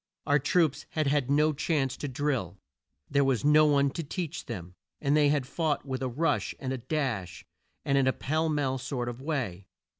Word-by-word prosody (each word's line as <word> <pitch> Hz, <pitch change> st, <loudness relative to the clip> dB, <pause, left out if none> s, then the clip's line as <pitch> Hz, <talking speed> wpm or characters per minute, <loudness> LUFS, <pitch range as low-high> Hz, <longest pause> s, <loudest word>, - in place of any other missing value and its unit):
Our 145 Hz, +1 st, +3 dB
troops 155 Hz, +1 st, +1 dB
had 155 Hz, -1 st, -1 dB
had 140 Hz, -2 st, +1 dB
no 150 Hz, +2 st, +3 dB
chance 140 Hz, -3 st, 0 dB
to 145 Hz, -, -4 dB
drill, 130 Hz, -, -2 dB, 0.5 s
there 140 Hz, 0 st, +2 dB
was 135 Hz, -2 st, +1 dB
no 155 Hz, +1 st, +6 dB
one 140 Hz, -2 st, +3 dB
to 165 Hz, -, -4 dB
teach 165 Hz, +1 st, -5 dB
them, 90 Hz, -7 st, -6 dB, 0.3 s
and 140 Hz, 0 st, +2 dB
they 150 Hz, -1 st, +5 dB
had 145 Hz, -3 st, +1 dB
fought 150 Hz, +2 st, -1 dB
with 130 Hz, -1 st, -4 dB
a 130 Hz, -, -1 dB
rush 155 Hz, +7 st, 0 dB
and 130 Hz, -1 st, -3 dB
a 130 Hz, -, -4 dB
dash, 120 Hz, -, -3 dB, 0.4 s
and 140 Hz, 0 st, +3 dB
in 130 Hz, -, +2 dB
a -, -, +5 dB
pell 155 Hz, +3 st, -1 dB
mell 135 Hz, -3 st, 0 dB
sort 125 Hz, -1 st, -3 dB
of 120 Hz, +1 st, -7 dB
way. 120 Hz, -, -3 dB
140 Hz, 200 wpm, -29 LUFS, 130-150 Hz, 0.5 s, no